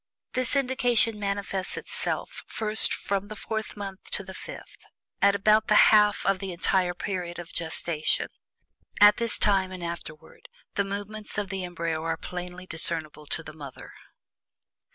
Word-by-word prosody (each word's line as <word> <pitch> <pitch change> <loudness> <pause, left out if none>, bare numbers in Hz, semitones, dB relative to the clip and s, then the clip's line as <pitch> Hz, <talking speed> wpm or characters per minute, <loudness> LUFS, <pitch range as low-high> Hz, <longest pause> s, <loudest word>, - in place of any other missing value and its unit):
This 255 +1 0
indication 245 -5 +2
manifests 200 -2 -2 0.7
first 220 -1 +2
from 200 0 -2
the 215 - -7
fourth 220 0 -4
month 195 -2 -7
to 200 - +1
the 190 0 -9
fifth - - -10 0.4
at 200 0 +5
about 215 +2 +4
the 215 - +4
exact - - +8
half 210 -1 +5
of 195 -1 +2
the 195 -1 -4
entire 180 0 +1
period 180 -3 -4
of 175 -1 -8
gestation. 160 -1 +1 0.7
At 205 0 +8
this 230 -2 0
time, 195 -2 +2
and 185 -2 -7
afterward, 170 - -8 0.2
the 200 - +1
movements 205 +2 -4
of 205 -2 -1
the 190 -1 -3
embryo 170 -3 -3
are 165 0 -1
plainly 180 +1 -6
discernable 160 -3 -1
to 165 - -1
the 155 - -9
mother. 145 -4 -10
195 Hz, 155 wpm, -27 LUFS, 175-210 Hz, 0.7 s, exact